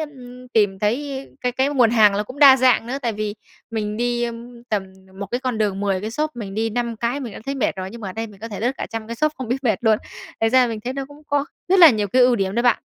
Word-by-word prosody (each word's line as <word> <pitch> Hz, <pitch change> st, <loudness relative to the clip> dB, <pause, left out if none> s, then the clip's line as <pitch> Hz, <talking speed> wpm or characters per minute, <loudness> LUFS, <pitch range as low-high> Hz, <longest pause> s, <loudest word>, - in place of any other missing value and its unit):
ừm, 250 Hz, -4 st, -9 dB
tìm 205 Hz, -5 st, +2 dB
thấy 265 Hz, +6 st, -2 dB
cái 250 Hz, -1 st, -1 dB
cái 265 Hz, +3 st, +1 dB
nguồn 250 Hz, -6 st, +3 dB
hàng 215 Hz, -3 st, +5 dB
nó 205 Hz, -, 0 dB
cũng 255 Hz, +6 st, -11 dB
đa 275 Hz, -2 st, +9 dB
dạng 250 Hz, -3 st, +3 dB
nữa, 265 Hz, +3 st, -3 dB
tại 235 Hz, -2 st, 0 dB
vì 210 Hz, 0 st, -3 dB, 0.4 s
mình 210 Hz, -2 st, -3 dB
đi, 240 Hz, +1 st, 0 dB
ừm, 235 Hz, 0 st, -8 dB
tầm 210 Hz, -3 st, 0 dB, 0.4 s
một 200 Hz, -, -4 dB
cái 245 Hz, -, -1 dB
con 255 Hz, -4 st, -2 dB
đường, 200 Hz, -2 st, 0 dB
10 195 Hz, -2 st, 0 dB
cái 215 Hz, +3 st, -4 dB
shop 305 Hz, +6 st, -1 dB
mình 200 Hz, -4 st, -6 dB
đi 225 Hz, +1 st, -1 dB
5 235 Hz, 0 st, -2 dB
cái 235 Hz, +5 st, -2 dB
mình 240 Hz, -5 st, -6 dB
đã -, -, -9 dB
thấy 275 Hz, -, -2 dB
mệt 260 Hz, -6 st, -1 dB
rồi, 185 Hz, 0 st, -4 dB
nhưng 235 Hz, -, -9 dB
mà 205 Hz, -, -5 dB
ở 185 Hz, -, -6 dB
đây 225 Hz, +2 st, -4 dB
mình 205 Hz, -3 st, -16 dB
có 225 Hz, -, -6 dB
thể 205 Hz, -4 st, -7 dB
lướt 240 Hz, +4 st, +1 dB
cả -, -, -3 dB
trăm 225 Hz, -1 st, -5 dB
cái 235 Hz, -, -6 dB
shop 305 Hz, +4 st, +1 dB
không 260 Hz, -3 st, -5 dB
biết 265 Hz, +3 st, -2 dB
mệt 220 Hz, -6 st, +2 dB
luôn. 220 Hz, -1 st, +4 dB, 0.4 s
Thật 225 Hz, -, +3 dB
ra 255 Hz, +1 st, +5 dB
mình 225 Hz, -2 st, -4 dB
thấy 250 Hz, +4 st, -4 dB
nó 275 Hz, 0 st, -4 dB
cũng 290 Hz, +1 st, -15 dB
có 285 Hz, -1 st, +1 dB, 0.2 s
rất 385 Hz, -, +4 dB
là 335 Hz, -4 st, +10 dB
nhiều 210 Hz, -4 st, 0 dB
cái 255 Hz, +6 st, +4 dB
ưu 245 Hz, -1 st, +4 dB
điểm 195 Hz, -1 st, -1 dB
đấy 235 Hz, -, +1 dB
bạn. 245 Hz, -2 st, +3 dB
235 Hz, 300 wpm, -21 LUFS, 215-255 Hz, 0.4 s, là